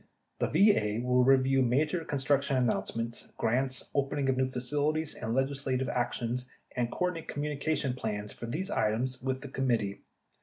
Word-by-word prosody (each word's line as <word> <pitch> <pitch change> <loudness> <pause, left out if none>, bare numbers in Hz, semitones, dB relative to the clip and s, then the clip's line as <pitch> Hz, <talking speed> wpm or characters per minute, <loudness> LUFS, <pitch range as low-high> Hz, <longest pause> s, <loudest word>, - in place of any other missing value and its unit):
The - - +2
VA 120 - +3
will 125 0 +4
review 135 0 +4
major 150 +7 +1
construction 140 -1 +1
announcements, 115 -1 -1
grants, 130 +3 0
opening 140 -1 0
of 130 - +2
new 130 0 +2
facilities, 145 +5 -1
and 115 +1 -3
legislative 135 -1 0
actions 125 0 -2 0.3
and 120 -2 0
coordinate 180 +2 -2
communication 145 -1 -1
plans 105 -4 -4
for 120 - -7
these 180 - -2
items 125 +4 0
with 130 0 -2
the 140 - -7
Committee. 115 -7 0
130 Hz, 145 wpm, -30 LUFS, 120-145 Hz, 0.3 s, will